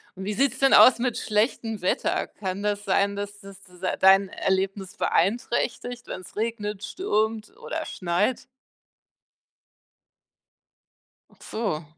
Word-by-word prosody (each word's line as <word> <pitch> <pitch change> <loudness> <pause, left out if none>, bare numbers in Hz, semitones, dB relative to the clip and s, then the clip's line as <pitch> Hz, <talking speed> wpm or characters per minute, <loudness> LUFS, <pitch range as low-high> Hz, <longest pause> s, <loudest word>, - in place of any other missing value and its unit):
Und 190 +1 -7
wie 210 - -2
sieht's 275 +5 +1
denn 270 0 +4
aus 255 - +8
mit 245 -1 -1
schlechtem 220 -1 -1
Wetter? 180 - 0
Kann 190 0 -5
das 205 0 -1
sein, 200 +1 +1
dass 205 0 -6
das 195 -1 -12
es 180 0 -18 0.2
dein 195 +1 +6
Erlebnis 190 0 -2
beeinträchtigt, 240 +4 -1
wenn's 185 - -8
regnet, 210 -2 -3
stürmt 220 - -2
oder - - -5
schneit? 180 +9 -1 2.9
Ach - - -24
so. 200 -8 -3
205 Hz, 120 wpm, -25 LUFS, 190-230 Hz, 2.9 s, aus